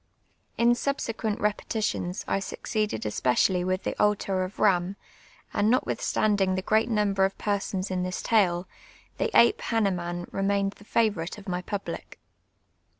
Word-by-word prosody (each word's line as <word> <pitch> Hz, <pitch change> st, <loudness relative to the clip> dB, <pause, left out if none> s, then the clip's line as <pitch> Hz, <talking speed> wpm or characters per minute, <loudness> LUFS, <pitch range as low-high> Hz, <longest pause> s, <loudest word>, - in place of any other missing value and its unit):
In 235 Hz, +1 st, +4 dB
8ubst>qucnt 230 Hz, -4 st, -1 dB
repetitions 210 Hz, -3 st, -1 dB
I -, -, +1 dB
succeeded 210 Hz, -, -2 dB
esjx.'eiallv 130 Hz, -, +1 dB
with 185 Hz, +1 st, -1 dB
the -, -, -2 dB
Altar 200 Hz, -2 st, +1 dB
of 185 Hz, +1 st, -6 dB
lliini; 190 Hz, -2 st, +2 dB, 0.6 s
and 210 Hz, +2 st, +2 dB
notwithstandinj!: 205 Hz, -6 st, +1 dB
the 185 Hz, -, -2 dB
preat 220 Hz, +3 st, +2 dB
number 205 Hz, -3 st, +2 dB
of 195 Hz, 0 st, 0 dB
persona 200 Hz, -2 st, -1 dB
in 185 Hz, -1 st, -1 dB
this 180 Hz, 0 st, -3 dB
tide, 180 Hz, -6 st, +3 dB, 0.6 s
the -, -, +1 dB
ape 235 Hz, -, +5 dB
llannemium 175 Hz, -6 st, -1 dB
remained 195 Hz, 0 st, +1 dB
the 205 Hz, -, -15 dB
favorite 210 Hz, -7 st, 0 dB
of 205 Hz, -, -12 dB
my 180 Hz, -1 st, -2 dB
public. 200 Hz, +2 st, -6 dB
195 Hz, 140 wpm, -27 LUFS, 185-215 Hz, 0.6 s, ape